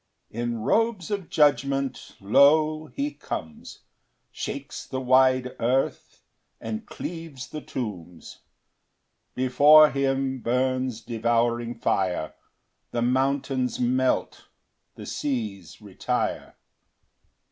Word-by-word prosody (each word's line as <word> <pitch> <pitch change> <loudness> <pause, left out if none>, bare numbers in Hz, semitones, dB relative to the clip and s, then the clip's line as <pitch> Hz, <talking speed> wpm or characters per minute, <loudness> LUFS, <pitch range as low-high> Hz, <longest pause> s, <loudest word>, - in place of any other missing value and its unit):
3 115 - -7
In 120 -1 -2
robes 220 - +1
of 200 -4 -3
judgment, 140 -2 +1
lo! 155 +8 +4
he 285 - -3
comes, 80 -1 -7 0.5
Shakes - - -6
the 130 - -4
wide 130 0 +3
earth, 125 +3 -1 0.4
and 110 -1 -5
cleaves 165 -6 -7
the 155 - -6
tombs; 90 -8 -7 1.0
Before 145 +4 +6
him 135 -1 -1
burns 130 -1 -1
devouring 120 +1 0
fire, 90 -8 -1 0.6
The 120 - -2
mountains 130 0 0
melt, 130 +1 0 0.5
the - - -9
seas 110 - -4
retire. - - -3
130 Hz, 95 wpm, -25 LUFS, 120-140 Hz, 1.0 s, Before